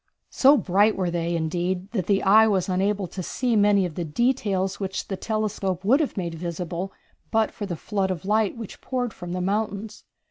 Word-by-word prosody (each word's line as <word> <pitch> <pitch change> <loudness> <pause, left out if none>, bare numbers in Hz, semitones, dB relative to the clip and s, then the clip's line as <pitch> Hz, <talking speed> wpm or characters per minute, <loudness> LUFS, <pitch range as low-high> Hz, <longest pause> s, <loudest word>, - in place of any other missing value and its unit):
So 275 +2 +6
bright 205 0 +3
were 180 -2 -1
they, 170 0 -1
indeed, 175 +4 -2
that 190 -7 -2
the 200 -1 +2
eye 215 +3 +6
was 195 -4 +1
unable 195 +2 0
to 185 - -6
see 240 +6 -1
many 205 -2 +4
of 175 - -5
the 175 - -3
details 195 - 0
which 190 -1 -4
the 195 - -1
telescope 200 -3 -2
would 260 +8 +5
have 295 -8 -1
made 170 -3 -2
visible 175 +2 -4 0.4
but 220 +2 +2
for 205 - -6
the 175 - -3
flood 195 +2 -2
of 185 -2 -4
light 215 +2 +1
which 225 -4 -8
poured 250 -3 -2
from 175 -1 -7
the 180 - -2
mountains. 205 +2 -2
195 Hz, 200 wpm, -24 LUFS, 180-215 Hz, 0.4 s, So